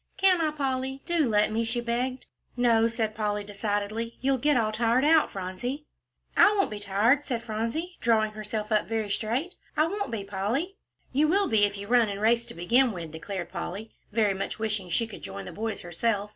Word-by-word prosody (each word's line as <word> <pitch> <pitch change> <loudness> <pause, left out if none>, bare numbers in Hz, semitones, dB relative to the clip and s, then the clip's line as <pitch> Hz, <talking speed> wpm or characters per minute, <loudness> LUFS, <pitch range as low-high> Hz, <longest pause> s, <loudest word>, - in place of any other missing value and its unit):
"Can't 370 -3 +4
I, 315 - +2
Polly? 270 -2 -2
Do 330 -7 +2
let 210 0 +3
me," 225 +2 0
she 235 +2 -1
begged. 245 +2 -2 0.3
"No," 230 -2 +4
said 225 -2 -1
Polly, 210 -1 -1
decidedly, 205 +2 -3
"you'll 265 0 +1
get 295 +2 +3
all 220 -2 +1
tired 235 +4 +2
out, 315 0 +5
Phronsie." 200 +10 -5 0.5
"I 420 - +6
won't 390 - +2
be 210 - -5
tired," 205 +8 +2
said 240 -5 -3
Phronsie, 230 +12 -3
drawing 220 -2 +3
herself 215 0 -5
up 215 - +2
very 220 -2 -2
straight; 250 - -1 0.2
"I 310 - +5
won't 405 +4 -2
be, 225 -4 -3
Polly." 225 - -2 0.4
"You 295 +4 +4
will 390 +4 +3
be 215 -6 +4
if 200 0 -3
you 200 - -6
run 235 0 +4
and 200 0 -4
race 230 +2 +3
to - - -10
begin 235 +9 +3
with," 170 -4 -6
declared 175 +3 -5
Polly, 195 +4 -5 0.2
very 210 -2 +2
much 195 +1 -4
wishing 215 -4 -2
she 200 +7 +1
could 220 - -10
join - - -7
the - - -7
boys 220 +1 -3
herself. 205 +4 -1
225 Hz, 200 wpm, -27 LUFS, 205-260 Hz, 0.5 s, I